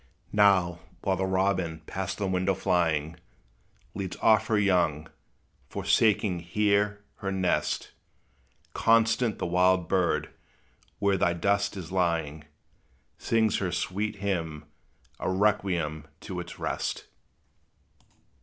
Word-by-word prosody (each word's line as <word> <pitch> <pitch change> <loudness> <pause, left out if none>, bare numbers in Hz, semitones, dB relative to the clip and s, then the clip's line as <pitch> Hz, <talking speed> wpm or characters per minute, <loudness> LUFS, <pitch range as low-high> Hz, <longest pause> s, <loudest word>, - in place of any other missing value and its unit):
Now, 95 -4 +4 0.2
while 95 - +1
the 95 +1 -1
robin, 95 -4 0
past 95 +1 -4
the 100 - -2
window 95 0 +1
flying, 80 -4 0 0.8
Leads 95 -2 -5
off 110 -1 +4
her 110 - +2
young, 85 -6 +2 0.6
forsaking 105 -5 +2
here 105 +3 0
her 100 -2 -3
nest, 95 -2 -1 0.8
Constant 115 0 +3
the - - -3
wild 90 0 +2
bird, 90 -3 0 0.7
where 100 -1 +2
thy 85 -1 +2
dust 100 +3 0
is 90 -3 -7
lying, 80 -5 -1 0.7
Sings 110 -2 +1
her 95 -3 -2
sweet 100 +5 -2
hymn, 85 -7 -3 0.5
a - - -2
requiem 90 -6 0
to 95 -3 -6
its 85 - -8
rest. - - -3
95 Hz, 110 wpm, -27 LUFS, 85-100 Hz, 0.8 s, Now